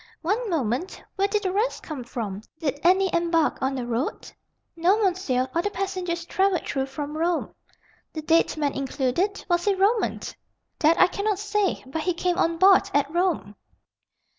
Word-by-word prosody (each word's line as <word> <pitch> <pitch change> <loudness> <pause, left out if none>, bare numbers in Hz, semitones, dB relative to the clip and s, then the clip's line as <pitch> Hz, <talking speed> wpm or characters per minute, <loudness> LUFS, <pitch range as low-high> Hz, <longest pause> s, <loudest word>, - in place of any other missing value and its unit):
"One 425 +7 0
moment. 285 - -1 0.2
Where 395 +1 +2
did 420 +1 -1
the 375 - 0
rest 430 +6 -1
come 295 -6 -6
from? 215 -5 -5 0.2
Did 285 -3 -2
any 375 +1 +3
embark 335 -2 +1
on 265 +1 0
the 250 -2 -3
road?" 240 +3 -3 0.4
"No, 350 +5 +3
monsieur; 360 - 0
all 335 - +1
the 410 - -1
passengers 370 -3 -3
travelled 380 0 +1
through 270 -1 -1
from 290 +2 -6
Rome." 335 +2 -1 0.6
"The 310 - -6
dead 325 0 +2
man 290 -2 0
included? 275 +9 -1
Was 345 -1 +1
he 405 -1 +3
Roman?" 410 +4 +1 0.6
"That 325 +1 +4
I - - +8
cannot 405 +2 -1
say, 415 -1 -1
but 280 +5 -4
he 360 +1 -1
came 355 0 0
on 330 0 +1
board 380 +2 +5
at 285 +1 +1
Rome." 345 - 0
340 Hz, 170 wpm, -25 LUFS, 285-385 Hz, 0.6 s, I